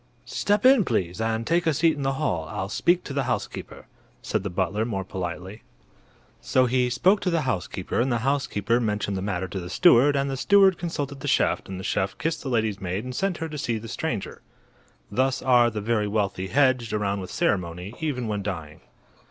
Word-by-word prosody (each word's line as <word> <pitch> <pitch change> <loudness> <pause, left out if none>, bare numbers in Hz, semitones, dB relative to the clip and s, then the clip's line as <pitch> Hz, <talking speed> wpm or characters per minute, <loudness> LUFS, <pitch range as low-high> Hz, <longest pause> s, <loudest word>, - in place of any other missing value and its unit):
"Step 205 +3 0
in, 260 -4 +7
please, 95 - -1
and 115 0 -1
take 170 +3 +1
a 160 - +3
seat 165 +3 +3
in 145 - -6
the 135 0 0
hall. 90 - -1
I'll 100 -2 -4
speak 175 - +2
to 140 - -6
the 140 -2 0
housekeeper," - - -4 0.4
said - - -1
the 100 - -4
butler, 95 +4 -1
more 105 -4 -2
politely. 95 +2 -6 0.8
So 130 0 +3
he 125 0 +1
spoke 180 - +3
to 185 - 0
the 165 -2 +1
housekeeper 95 - -2
and 130 +2 0
the 120 - +2
housekeeper 120 -5 +1
mentioned 105 -3 -1
the 95 - -3
matter 95 -2 -2
to 95 - -4
the 90 -1 -7
steward 145 - +5
and 140 0 +1
the 135 - -2
steward 195 +3 +5
consulted 145 -5 -4
the - - -6
chef - - +1
and 95 -1 -6
the - - -7
chef 95 -1 -1
kissed 165 0 -2
the 135 - -5
lady's 110 -5 0
maid 95 +3 -3
and 125 0 -6
sent 195 +2 -1
her 165 -1 -4
to 150 -1 -6
see 120 -5 -1
the 110 +1 -8
stranger. - - -4 0.7
Thus 130 +1 0
are 120 -2 +5
the 105 -2 -4
very 105 -1 0
wealthy 100 -3 -1
hedged 130 -2 +2
around 100 -2 -1
with 90 - -7
ceremony, 90 +1 -1
even 130 -7 -2
when 105 -1 -2
dying. 85 -6 -6
115 Hz, 210 wpm, -25 LUFS, 95-140 Hz, 0.8 s, in